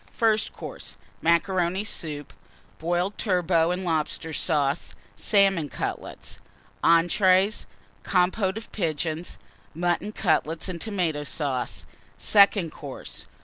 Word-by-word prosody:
FIRST 220 Hz, -2 st, +2 dB
COURSE. 100 Hz, -, -9 dB, 0.2 s
Macaroni 175 Hz, +2 st, +2 dB
Soup. 150 Hz, -8 st, -5 dB, 0.5 s
Boiled 175 Hz, +4 st, -1 dB
Turbot 175 Hz, -4 st, +2 dB
and 180 Hz, +1 st, -2 dB
Lobster 160 Hz, 0 st, -1 dB
Sauce. 145 Hz, -4 st, 0 dB, 0.2 s
Salmon 195 Hz, -7 st, +3 dB
Cutlets. -, -, -5 dB, 0.4 s
ENTREES. 185 Hz, +4 st, +4 dB, 0.4 s
Compôte 190 Hz, +2 st, +1 dB
of 225 Hz, -, -9 dB
Pigeons. 165 Hz, -2 st, -2 dB, 0.4 s
Mutton 175 Hz, +4 st, 0 dB
Cutlets 165 Hz, -5 st, 0 dB
and 175 Hz, -3 st, -5 dB
Tomato 175 Hz, -9 st, -1 dB
Sauce. 140 Hz, -4 st, -2 dB, 0.3 s
SECOND 200 Hz, -5 st, +4 dB
COURSE. 140 Hz, -3 st, -8 dB
175 Hz, 100 wpm, -26 LUFS, 160-190 Hz, 0.5 s, ENTREES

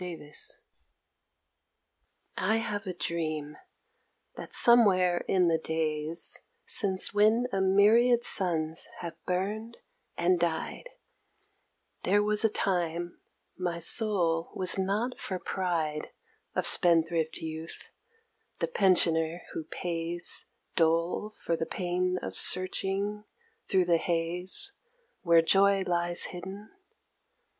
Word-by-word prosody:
AGE 165 Hz, -4 st, -9 dB, 2.0 s
I 215 Hz, +4 st, +1 dB
have 210 Hz, -3 st, -3 dB
a 185 Hz, -, -3 dB
dream, 155 Hz, -4 st, -3 dB, 0.8 s
that -, -, -9 dB
somewhere 185 Hz, -7 st, +4 dB
in 180 Hz, -2 st, +2 dB
the 165 Hz, -1 st, +2 dB
days, 160 Hz, 0 st, +1 dB, 0.2 s
Since 190 Hz, -3 st, 0 dB
when 215 Hz, +4 st, +3 dB
a 195 Hz, -, 0 dB
myriad 220 Hz, +5 st, +4 dB
suns 160 Hz, -4 st, -2 dB
have 170 Hz, -2 st, -6 dB
burned 210 Hz, +6 st, -3 dB, 0.4 s
and 175 Hz, +1 st, +2 dB
died, 170 Hz, -, -3 dB, 1.1 s
There 205 Hz, +3 st, +2 dB
was 210 Hz, +1 st, +1 dB
a 225 Hz, -, +4 dB
time 175 Hz, -4 st, -2 dB, 0.3 s
my 175 Hz, -2 st, -3 dB
soul 170 Hz, -3 st, +1 dB
was 185 Hz, -1 st, +3 dB
not 205 Hz, +6 st, -2 dB
for 185 Hz, -, -4 dB
pride 165 Hz, -5 st, -3 dB, 0.5 s
Of -, -, 0 dB
spendthrift 165 Hz, -2 st, +2 dB
youth, 160 Hz, +1 st, -8 dB, 0.7 s
the -, -, -1 dB
pensioner 170 Hz, -, +2 dB
who 160 Hz, -, -5 dB
pays 170 Hz, +1 st, -1 dB, 0.3 s
Dole 170 Hz, +6 st, 0 dB
for 165 Hz, -, -2 dB
the 160 Hz, -, -4 dB
pain 180 Hz, 0 st, -1 dB
of 95 Hz, 0 st, -6 dB
searching 195 Hz, +3 st, 0 dB, 0.4 s
thro' 190 Hz, -1 st, +2 dB
the 175 Hz, -1 st, +2 dB
haze 175 Hz, -, +1 dB, 0.5 s
Where 170 Hz, -2 st, +4 dB
joy 195 Hz, +2 st, +4 dB
lies 175 Hz, 0 st, 0 dB
hidden. 190 Hz, +4 st, -9 dB
180 Hz, 105 wpm, -28 LUFS, 165-200 Hz, 2.0 s, somewhere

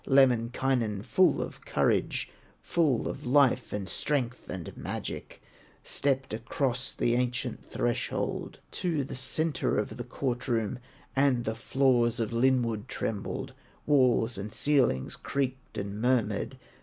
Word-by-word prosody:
Lemminkainen 125 Hz, -4 st, +3 dB
full 180 Hz, +10 st, +3 dB
of -, -, -9 dB
courage, -, -, +1 dB, 0.4 s
Full 150 Hz, -9 st, +2 dB
of -, -, -5 dB
life, 130 Hz, -2 st, +4 dB
and 100 Hz, -2 st, -3 dB
strength, 125 Hz, -2 st, -1 dB
and 90 Hz, -3 st, -6 dB
magic, -, -, -5 dB, 0.4 s
Stepped 135 Hz, -4 st, 0 dB
across 125 Hz, +3 st, -1 dB
the 120 Hz, -, +2 dB
ancient 125 Hz, -1 st, -1 dB
threshold, 120 Hz, -1 st, -2 dB
To 165 Hz, -6 st, 0 dB
the 135 Hz, -, -7 dB
centre 145 Hz, +5 st, 0 dB
of 105 Hz, -, -2 dB
the 120 Hz, -, -4 dB
court 125 Hz, 0 st, -3 dB
room, 115 Hz, +1 st, 0 dB, 0.4 s
And 135 Hz, -3 st, +3 dB
the 110 Hz, -, 0 dB
floors 120 Hz, 0 st, +2 dB
of 115 Hz, 0 st, -1 dB
linwood 115 Hz, -3 st, +2 dB
trembled, 105 Hz, -3 st, -3 dB, 0.3 s
Walls 125 Hz, -6 st, +3 dB
and 105 Hz, +2 st, -5 dB
ceilings 120 Hz, -, +2 dB
creaked 130 Hz, -2 st, -3 dB
and 100 Hz, +1 st, -4 dB
murmured. 125 Hz, -2 st, +1 dB
125 Hz, 125 wpm, -29 LUFS, 115-135 Hz, 0.4 s, life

